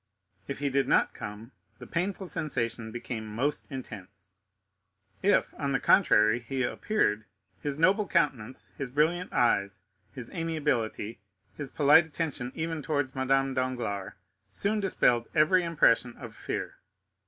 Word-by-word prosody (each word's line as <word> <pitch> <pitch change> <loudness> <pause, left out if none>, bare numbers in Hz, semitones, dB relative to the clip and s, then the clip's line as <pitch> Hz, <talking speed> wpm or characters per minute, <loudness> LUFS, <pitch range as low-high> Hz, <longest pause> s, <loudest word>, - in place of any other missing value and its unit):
If 140 - -4
he 140 -1 -1
did 135 0 +1
not - - +3
come, 105 +4 -8 0.3
the - - -10
painful 190 +2 -2
sensation 115 -10 -3
became 120 -1 -5
most 125 +8 -1
intense; 100 -7 -8 0.9
if, 205 +2 +2
on 140 -2 -1
the 135 - +2
contrary, 110 - +4
he 130 +2 -3
appeared, 115 - 0 0.4
his 145 -1 -2
noble 195 +5 +3
countenance, 135 -8 -1
his 135 -2 -4
brilliant 160 +7 +1
eyes, 100 -6 +1 0.3
his 125 -4 -8
amiability, 145 - -2 0.4
his 145 -3 -5
polite 150 +3 +5
attention 145 -6 -3
even 160 -1 -3
towards 145 -3 -1
Madame 135 0 +1
Danglars, 120 -7 -2 0.4
soon 210 +2 0
dispelled 125 - +2
every 170 +4 +4
impression 125 -7 +2
of - - -9
fear. - - -4
135 Hz, 130 wpm, -29 LUFS, 115-160 Hz, 0.9 s, polite